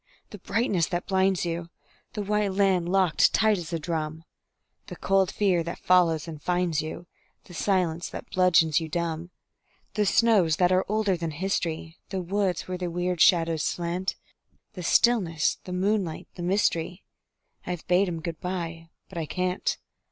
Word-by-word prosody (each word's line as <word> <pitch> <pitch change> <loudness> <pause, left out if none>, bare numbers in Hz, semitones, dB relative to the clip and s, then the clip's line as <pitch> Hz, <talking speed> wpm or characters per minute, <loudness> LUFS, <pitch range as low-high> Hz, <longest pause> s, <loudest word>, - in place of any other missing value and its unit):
the 205 - -9
brightness 200 -3 0
that 175 -1 -3
blinds 190 -2 +1
you, 170 0 -3 0.4
The 210 - -3
white 210 -1 0
land 190 -3 +2
locked 190 -4 +3
tight 215 -3 +3
as 170 -1 -7
a 165 - 0
drum, 160 -1 -4 0.6
The - - -7
cold 195 -1 +1
fear 190 -5 +2
that 170 +1 -5
follows 170 -4 +3
and 155 -3 -8
finds 175 -3 0
you, 155 +2 -7 0.4
The 180 - -14
silence 175 -3 0
that - - -9
bludgeons 170 -4 +4
you 160 -1 -6
dumb. 170 0 -3 0.6
The 210 -1 +1
snows 195 -8 +4
that 180 +2 +3
are 185 +1 +3
older 210 -2 +1
than 165 -1 -3
history, 165 -1 -3
The 190 - -3
woods 185 0 -1
where 185 -1 -4
the 180 -1 -2
weird 175 0 -2
shadows 165 -3 +4
slant; 175 +3 -2 0.6
The 185 - -7
stillness, 175 -5 +2
the 185 - -7
moonlight, 185 -2 -1
the 175 - -9
mystery, 180 -1 0 0.6
I've 180 -2 -4
bade 185 +2 +3
'em 165 -2 -4
good 165 -1 -5
by 165 -2 -4 0.2
but 175 - -6
I 160 - -3
can't. 185 +2 -1
180 Hz, 165 wpm, -26 LUFS, 165-190 Hz, 0.6 s, bludgeons